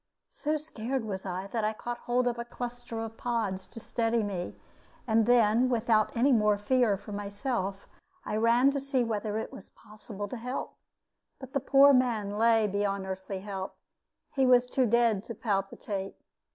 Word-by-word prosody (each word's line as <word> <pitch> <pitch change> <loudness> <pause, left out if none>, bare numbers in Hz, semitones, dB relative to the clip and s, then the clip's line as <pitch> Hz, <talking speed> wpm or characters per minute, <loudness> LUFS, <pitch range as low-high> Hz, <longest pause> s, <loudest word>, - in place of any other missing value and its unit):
So 310 -11 -1
scared 265 -5 -4
was 195 -2 -5
I 185 +1 -3
that 220 +2 -3
I 215 +1 +1
caught 240 +2 -5
hold 245 +1 0
of 240 -1 -1
a - - -2
cluster 240 -1 -6
of 225 0 -6
pods 215 -6 -2
to - - -10
steady 230 0 0
me; 185 -4 -4 0.5
and 225 -2 +2
then, 240 +1 +4
without 225 -2 +2
any 265 +4 +4
more 210 -4 +4
fear 215 0 +2
for 210 - -11
myself, 200 -1 -3 0.4
I 210 - -2
ran 235 +4 +4
to 280 - -1
see 270 -2 0
whether 215 -2 -2
it 220 - -4
was 195 - -11
possible 210 -1 -9
to 250 - -5
help. 250 +3 -4 0.6
But 265 -1 -11
the 275 - +2
poor 275 +1 +6
man 235 -6 +2
lay 225 +1 +3
beyond 200 -1 -1
earthly 190 0 -5
help; 195 -1 -5 0.6
he 270 -2 +3
was 250 -1 +6
too 250 0 +1
dead 230 -3 +3
to 230 - -6
palpitate. 195 -2 -3
225 Hz, 175 wpm, -29 LUFS, 205-245 Hz, 0.6 s, poor